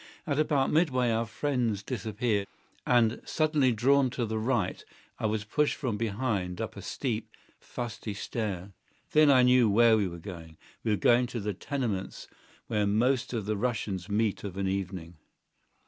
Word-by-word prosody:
At 145 -3 -1
about 145 -3 +2
midway 130 -7 +2
our 115 +1 0
friends 120 -4 -1
disappeared, 105 -2 -1 0.4
and, 120 -2 +3
suddenly 155 -5 +2
drawn 130 +4 +3
to 120 -1 -2
the 110 0 -2
right, 110 -5 -1 0.4
I - - 0
was 105 0 -1
pushed 150 +7 +1
from 125 -7 -2
behind 105 -5 -2
up - - -4
a - - -8
steep, 115 -4 -3 0.3
fusty 115 -3 -6
stair. 100 -3 -4 0.4
Then 155 -1 +6
I 130 -2 +6
knew 125 -2 +5
where 115 +2 +5
we 100 -3 +1
were 85 -1 -7
going. 80 -3 -9 0.3
We - - -1
were 105 - +2
going 120 +6 +4
to 120 -1 -4
the 105 0 -2
tenements 110 -4 -4 0.4
where 105 -2 0
most 120 +5 +1
of 115 -5 -3
the 105 +1 -1
Russians 100 -4 -2
meet 105 0 0
of 100 -2 -6
an 100 -1 -1
evening. 95 -3 -4
110 Hz, 165 wpm, -29 LUFS, 100-125 Hz, 0.4 s, Then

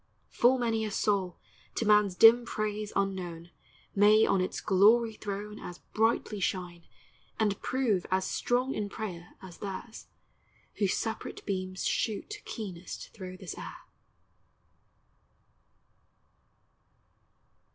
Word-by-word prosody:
Full 250 +2 +4
many 225 -3 0
a 215 - -2
soul, 195 -3 0 0.4
to 230 - -1
man's 210 -3 +4
dim 230 +4 +8
praise 215 -2 -3
unknown, 175 -4 -2 0.4
May 210 +2 +6
on 190 - +2
its 185 - -2
glory 220 +4 +4
throne 210 0 -6
As 175 - -8 0.2
brightly 220 -1 +1
shine, 175 -2 -3 0.5
and 205 -3 +1
prove 240 -8 0
as 185 0 +1
strong 250 +6 0
in 205 -1 -3
prayer 180 -6 -7
As 180 -2 -11
theirs, 205 +3 -7 0.7
whose 200 -3 +2
separate 225 0 -4
beams 185 -1 -3
shoot 330 - -2
keenest 190 -6 -7
thro' 185 -3 -8
this 185 -3 -7
air. - - -8
205 Hz, 110 wpm, -30 LUFS, 185-220 Hz, 0.7 s, dim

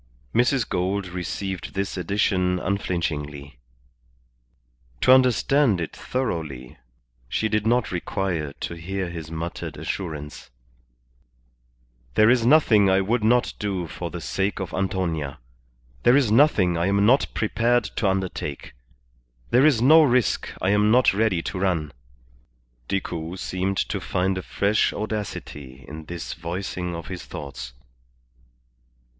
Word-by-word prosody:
Mrs. 120 0 +2
Gould 95 +2 -1
received 90 +1 -5
this 100 0 -2
addition 90 0 +1
unflinchingly. 75 -8 -3 1.4
To - - +5
understand 130 -3 +4
it 80 - -4
thoroughly 80 - -4 0.5
she 110 - 0
did 110 0 0
not 120 +1 +2
require 90 -4 -2
to - - -3
hear 90 +2 -4
his 80 -2 -7
muttered 80 +1 -5
assurance 75 -6 -5 1.7
"There 110 +2 +6
is 125 -2 +3
nothing 115 -9 +5
I 95 +1 +4
would 110 +4 0
not 120 +3 +3
do 100 -4 -2
for 80 - -6
the - - -7
sake 100 +2 -1
of 95 -4 -5
Antonia. 90 -7 -2 0.6
There 125 +3 +5
is 130 -7 +2
nothing 105 - +4
I 85 - +1
am 100 +1 +3
not 130 +6 +4
prepared 115 +2 +2
to 105 - +1
undertake. 95 -6 -3 0.8
There 130 +5 +6
is 120 -6 +3
no 155 +5 +8
risk 125 -6 +2
I 95 - +3
am 105 +1 +3
not 125 0 +5
ready 100 -5 +1
to 95 - -4
run." 85 -6 0 1.0
Decoud 85 -2 -3
seemed 95 +1 -2
to - - -1
find 95 +1 0
a 95 - -3
fresh 100 +3 +1
audacity 75 -11 -6
in 80 +1 -8
this 85 -1 -6
voicing 90 +1 -4
of 85 -1 -7
his 90 -1 -7
thoughts. 65 -3 -8
95 Hz, 130 wpm, -24 LUFS, 85-110 Hz, 1.7 s, no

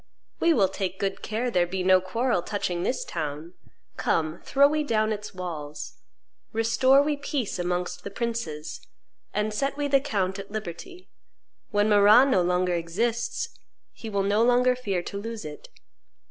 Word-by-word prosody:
We 335 - +4
will 205 -11 +4
take 190 -1 -4
good 195 -1 -2
care 235 +3 -2
there 175 -4 +2
be 185 +1 -3
no 185 0 +5
quarrel 230 +1 0
touching 180 -2 -2
this 250 +8 -1
town; 155 +1 -5 0.4
come, 160 +1 0
throw 280 0 +4
we 305 +1 0
down 220 -5 +1
its 210 -1 -7
walls; 155 -5 -6 0.5
restore 230 +5 +4
we 295 0 0
peace 280 - -3
amongst 180 0 -2
the - - -5
princes, 200 -9 -4 0.5
and 210 +1 -1
set 275 +5 -1
we 290 -1 0
the 275 -1 +4
count 195 -7 -1
at 195 - -8
liberty: 215 - -7 0.6
when 205 +1 +2
Marrah 210 +4 +7
no 255 -10 +3
longer 180 +1 +1
exists, 230 - -1 0.4
he 225 - -8
will 200 -2 0
no 205 +2 +2
longer 245 +1 +4
fear 200 -8 -2
to 200 - -5
lose 225 -1 -6
it." 150 -1 -9
205 Hz, 160 wpm, -26 LUFS, 180-245 Hz, 0.6 s, Marrah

